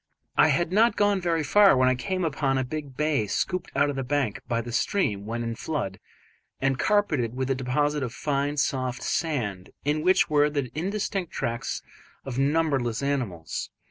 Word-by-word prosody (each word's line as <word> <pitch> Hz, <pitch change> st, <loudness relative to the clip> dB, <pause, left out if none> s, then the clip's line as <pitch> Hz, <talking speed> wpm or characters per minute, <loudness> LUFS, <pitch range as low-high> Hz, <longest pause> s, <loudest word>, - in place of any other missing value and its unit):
I -, -, +6 dB
had 175 Hz, 0 st, +1 dB
not 220 Hz, +3 st, +4 dB
gone 205 Hz, -2 st, +2 dB
very 165 Hz, -2 st, +1 dB
far 195 Hz, +1 st, +6 dB
when 130 Hz, 0 st, +4 dB
I 130 Hz, -, +4 dB
came 185 Hz, +8 st, -2 dB
upon 135 Hz, -3 st, 0 dB
a 130 Hz, -, +1 dB
big 140 Hz, 0 st, -6 dB
bay 150 Hz, -8 st, +1 dB
scooped 180 Hz, -, -1 dB
out 140 Hz, +1 st, +4 dB
of -, -, -6 dB
the 135 Hz, -, -2 dB
bank 135 Hz, -4 st, -1 dB
by 115 Hz, -2 st, 0 dB
the 120 Hz, +1 st, -5 dB
stream 110 Hz, -, 0 dB
when 115 Hz, +1 st, -3 dB
in 115 Hz, 0 st, -2 dB
flood 115 Hz, -7 st, -3 dB, 0.6 s
and 135 Hz, 0 st, +1 dB
carpeted 155 Hz, -, +1 dB
with 130 Hz, +1 st, -1 dB
a -, -, +4 dB
deposit 145 Hz, +3 st, 0 dB
of 125 Hz, -3 st, -2 dB
fine, 145 Hz, +2 st, -1 dB
soft 130 Hz, -4 st, -1 dB
sand, 120 Hz, -, -2 dB, 0.2 s
in 150 Hz, +1 st, +1 dB
which 185 Hz, +3 st, +4 dB
were 150 Hz, -2 st, +3 dB
the 140 Hz, -4 st, -2 dB
indistinct 195 Hz, +1 st, -2 dB
tracks 115 Hz, 0 st, -3 dB, 0.4 s
of 135 Hz, -1 st, -3 dB
numberless 140 Hz, -5 st, +1 dB
animals. 115 Hz, -, -2 dB
140 Hz, 180 wpm, -26 LUFS, 125-160 Hz, 0.6 s, I